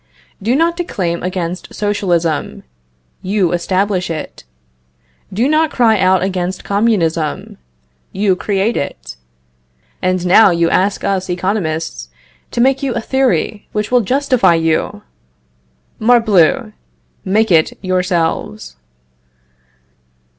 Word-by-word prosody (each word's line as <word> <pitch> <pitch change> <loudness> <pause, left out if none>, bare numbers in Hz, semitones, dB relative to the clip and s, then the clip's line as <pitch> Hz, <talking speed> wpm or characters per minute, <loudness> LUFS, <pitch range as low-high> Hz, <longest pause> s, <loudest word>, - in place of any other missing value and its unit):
Do 230 +6 +1
not 335 +3 +2
declaim 180 - -2
against 180 -1 -4
socialism; 175 -7 -1 0.6
you 190 -2 0
establish 185 +1 -1
it. 155 - -6 0.9
Do 225 +7 +1
not 310 +1 +2
cry 225 -6 +2
out 185 -1 +3
against 185 -1 -3
communism; 175 - -1 0.5
you 195 -1 +1
create 200 +4 -1
it. 60 - -5 0.9
And 185 -1 0
now 195 +4 +6
you 170 -1 +1
ask 195 +2 +1
us 190 -1 -1
Economists 180 -3 -3 0.4
to - - -5
make 270 +2 +2
you 265 -4 -2
a - - 0
theory 225 -5 -1
which 210 +1 -2
will 250 -1 +4
justify 255 -4 +2
you! 165 +6 -1 1.0
Morbleu! 220 -7 +3 0.5
make 215 +2 +1
it 160 -2 +3
yourselves. 175 - -2
190 Hz, 105 wpm, -16 LUFS, 175-220 Hz, 1.0 s, now